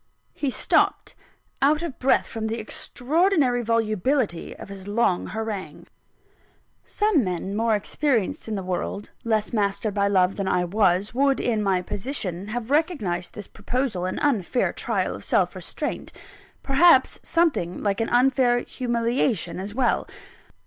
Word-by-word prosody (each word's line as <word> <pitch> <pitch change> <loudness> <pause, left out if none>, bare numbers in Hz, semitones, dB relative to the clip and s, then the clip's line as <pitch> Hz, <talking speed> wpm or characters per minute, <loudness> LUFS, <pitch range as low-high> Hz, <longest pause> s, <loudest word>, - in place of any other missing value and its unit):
He 285 - -2
stopped, - - +1 0.5
out 300 +4 +3
of 320 -6 -5
breath 265 - +3
from 220 -1 -4
the 225 +1 -2
extraordinary 270 - +1
volubility 225 - 0
of - - -9
his 195 -1 -9
long 205 -4 +1
harangue. 220 -3 -5 1.0
Some 415 - +2
men 185 +1 -3
more 225 0 +2
experienced 230 +1 -1
in 220 - -2
the 195 - -3
world, 185 +2 -4
less 220 -1 0
mastered 205 0 0
by 200 0 +1
love 190 -1 +2
than 195 -2 -2
I 180 -1 +1
was, 190 +1 +1
would, 275 +2 +2
in 225 -3 0
my 190 -3 +1
position, 195 -4 -3
have 240 +3 -4
recognised 265 - 0
this 210 - -7
proposal 220 -4 -2
an 185 - -3
unfair 250 -4 +1
trial - - -1
of - - -8
self - - +1
restraint - - -5 0.5
perhaps, 275 0 +5
something 305 - 0
like 200 +1 0
an 225 - -1
unfair 245 -1 +3
humiliation 235 -6 -1
as 200 +3 -6
well. 255 -1 +1
225 Hz, 140 wpm, -24 LUFS, 195-260 Hz, 1.0 s, perhaps